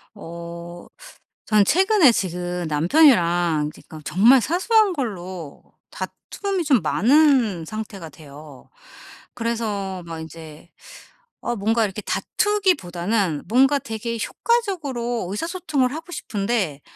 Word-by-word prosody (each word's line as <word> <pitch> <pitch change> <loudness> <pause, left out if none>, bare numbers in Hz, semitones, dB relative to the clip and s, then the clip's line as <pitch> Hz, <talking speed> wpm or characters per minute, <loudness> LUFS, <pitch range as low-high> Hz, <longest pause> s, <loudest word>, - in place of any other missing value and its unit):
어. 170 -1 -9 0.6
저는 210 -2 +4
최근에 375 - +5
지금 180 -3 -3
남편이랑 170 - +3
지금 155 - -13
정말 235 - +5
사소한 390 - +2
걸로 185 - -6 0.3
다툼이 390 -3 -4
좀 270 -7 +3
많은 250 - +3
상태가 200 -3 -7
돼요. 150 -4 -14 0.7
그래서 210 -6 -3
막 165 -1 -7
이제 160 0 -11 0.7
어 240 - -2
뭔가 225 +2 +1
이렇게 205 +1 -5
다투기보다는 205 - 0
뭔가 270 +5 +4
되게 230 -1 -5
효과적으로 285 - -1
의사소통을 310 - -1
하고 325 +3 -8
싶은데 205 - -2
215 Hz, 245 characters per minute, -22 LUFS, 175-280 Hz, 0.7 s, 최근에